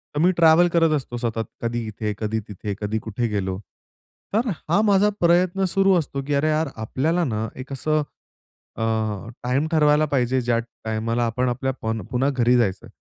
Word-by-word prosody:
तर - - 0
मी 180 +4 +4
ट्रॅव्हल 165 +1 +6
करत 165 -2 +4
असतो 120 -3 -6
सतत, 115 -2 -2 0.2
कधी 120 -1 -2
इथे, 105 0 -3
कधी 110 0 -2
तिथे, 105 0 -5
कधी 105 +1 -1
कुठे 110 +2 -3
गेलो. 95 -3 -2 0.7
तर 225 +4 +1 0.2
हा 185 +6 +4
माझा 205 -1 +4
प्रयत्न 180 +2 +3
सुरू 195 +1 +3
असतो, 140 -2 -4
की 145 - 0
अरे 155 +2 +2
यार 155 0 +1
आपल्याला 150 +10 0
ना 110 -3 -2
एक 135 +2 -7
असं 155 +4 0 0.8
अ, - - -4 0.6
टाईम 130 +5 0
ठरवायला 150 -1 +4
पाहिजे 130 -1 +2
ज्या 120 -1 +1 0.3
टाईमाला 115 +2 -1
आपण 125 +3 0
आपल्या 130 +2 -1
पन 110 0 -2
पुन्हा 130 +2 +1
घरी 125 0 +4
जायचं. 95 -6 0
130 Hz, 175 wpm, -23 LUFS, 110-160 Hz, 0.8 s, ट्रॅव्हल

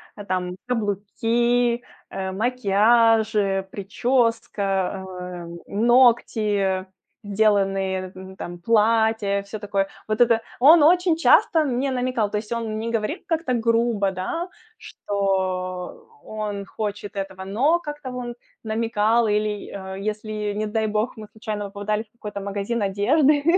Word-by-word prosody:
А 205 - -9
там 180 -1 -2
каблуки, 235 +2 0 0.3
э, 190 0 -4
макияжи, 220 -2 +2
прическа, 230 +1 0 0.4
а, 180 -2 -7
м, 170 0 -9
ногти, 215 -4 +3 0.4
сделанные, 195 -2 +1
м, 190 0 -10
там, 175 0 -6
платья, 220 -1 +2
всё 200 +2 -7
такое. 200 -1 -1 0.2
Вот 215 +2 0
это 230 -1 +4 0.2
он 305 +5 +8
очень 350 +1 +4
часто 325 -1 +4
мне 265 +1 -1
намекал. 250 -4 0
То 210 - 0
есть 215 +2 -6
он 225 -2 -2
не 230 - -3
говорил 230 - -1
как-то 330 -7 0
грубо, 230 -3 +1
да, 260 - -4 0.3
что 185 -2 -3
он 210 -2 -5
хочет 205 0 -5
этого, 190 -1 -5
но 275 - +2
как-то 295 -4 -7
он 245 -1 -5 0.3
намекал 225 +1 +1
или, 210 0 -1
э, 190 -1 -7
если, 210 0 -3
не 215 +1 -2
дай 220 0 0
бог, 215 +4 -1
мы 215 -1 -9
случайно 215 -2 -5
попадали 205 +2 -2
в 220 - -35
какой-то 210 -3 -7
магазин 200 +3 -2
одежды, 275 +10 +3
215 Hz, 130 wpm, -23 LUFS, 200-235 Hz, 0.4 s, он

